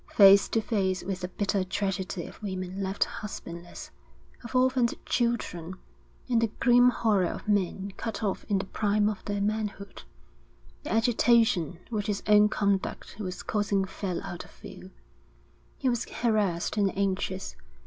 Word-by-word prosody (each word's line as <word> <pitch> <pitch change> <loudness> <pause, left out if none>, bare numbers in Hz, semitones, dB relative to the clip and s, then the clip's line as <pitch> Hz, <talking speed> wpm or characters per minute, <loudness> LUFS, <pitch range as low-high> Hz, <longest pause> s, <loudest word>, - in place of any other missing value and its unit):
Face 200 -1 +8
to 225 - +1
face 195 -4 0
with 185 0 -3
the 180 - -3
bitter 200 +1 -1
tragedy 190 -2 -2
of - - -12
women 185 -1 -4
left 195 +1 +1
husbandless, 175 -4 -8 0.5
of 235 +2 -8
orphaned 255 -2 +3
children, 200 -8 -1 0.5
and 235 -3 +2
the 230 - +3
grim 245 0 +6
horror 210 -7 +2
of - - -6
men 200 -1 0
cut 225 -1 -4
off 200 -3 -1
in 205 - +1
the 190 - -2
prime 205 +1 +1
of 210 -2 -3
their 205 -1 -2
manhood, 210 -1 -3 0.8
the 295 - -6
agitation 225 - +3
which 210 -2 -2
his 205 -2 -2
own 210 0 +6
conduct 200 -2 -1
was 185 -3 -5
causing 205 -2 0
fell 190 -2 -4
out 185 -3 -6
of - - -16
view. - - -12 0.9
He - - -2
was 240 -2 +1
harassed 210 -6 0
and 200 -2 +1
anxious. 190 -1 -2
200 Hz, 150 wpm, -28 LUFS, 190-220 Hz, 0.9 s, Face